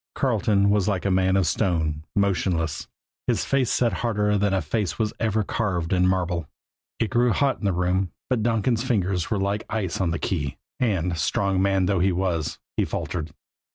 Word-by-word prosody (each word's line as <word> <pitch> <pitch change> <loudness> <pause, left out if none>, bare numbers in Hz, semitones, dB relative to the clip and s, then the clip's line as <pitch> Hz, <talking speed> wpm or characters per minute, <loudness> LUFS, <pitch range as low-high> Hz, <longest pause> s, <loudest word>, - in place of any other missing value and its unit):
Carleton 105 -5 +2
was 100 -2 +2
like 100 -3 -1
a 100 - +2
man 95 +1 +3
of 95 - +2
stone, 80 -2 0
motionless, 90 -6 0 0.4
his - - +1
face 135 -3 +1
set 120 -2 +2
harder 105 -3 0
than 100 -1 +2
face 90 +4 -2
was 110 0 0
ever 110 -1 +1
carved 95 -5 -1
in 90 0 +3
marble. 90 -4 0 0.5
It 115 - -1
grew 120 -1 +3
hot 135 +5 +1
in - - -5
the 100 - +3
room; 90 0 0 0.2
but 125 -4 0
Donkin's 115 +1 +1
fingers 95 - 0
were 105 - 0
like 100 +2 -1
ice 100 -5 -2
on 90 - +1
the 85 - -1
key, 75 -8 -2 0.2
and, 90 -8 0
strong 95 +5 +1
man 95 -1 +2
though 95 -1 +1
he 95 +2 +3
was, 85 -4 -1 0.2
he - - +3
faltered. 80 -2 -3
95 Hz, 185 wpm, -24 LUFS, 90-105 Hz, 0.5 s, man